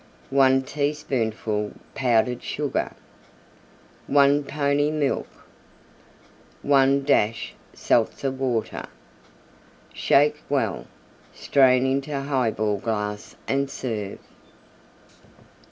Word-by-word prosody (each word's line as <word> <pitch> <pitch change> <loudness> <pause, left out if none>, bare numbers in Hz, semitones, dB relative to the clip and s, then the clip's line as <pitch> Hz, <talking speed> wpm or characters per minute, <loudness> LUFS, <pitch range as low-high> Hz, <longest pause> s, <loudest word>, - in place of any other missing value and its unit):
1 135 -1 +4
teaspoonful 125 -8 -2 0.2
Powdered 125 -1 +1
Sugar. 145 -1 -2 1.2
1 140 +1 +4
pony 145 0 +1
Milk. 150 -3 -1 1.4
1 140 0 +3
dash 115 -5 +1 0.2
Seltzer 120 +4 +1
Water. 130 -4 -2 1.1
Shake 150 +2 +3
well; 130 -8 -1 0.5
strain 130 -2 +3
into 140 +2 -1
Highball 115 -7 0
glass 105 -1 -4
and 140 0 0
serve. 110 -7 -4
135 Hz, 75 wpm, -24 LUFS, 115-140 Hz, 1.4 s, 1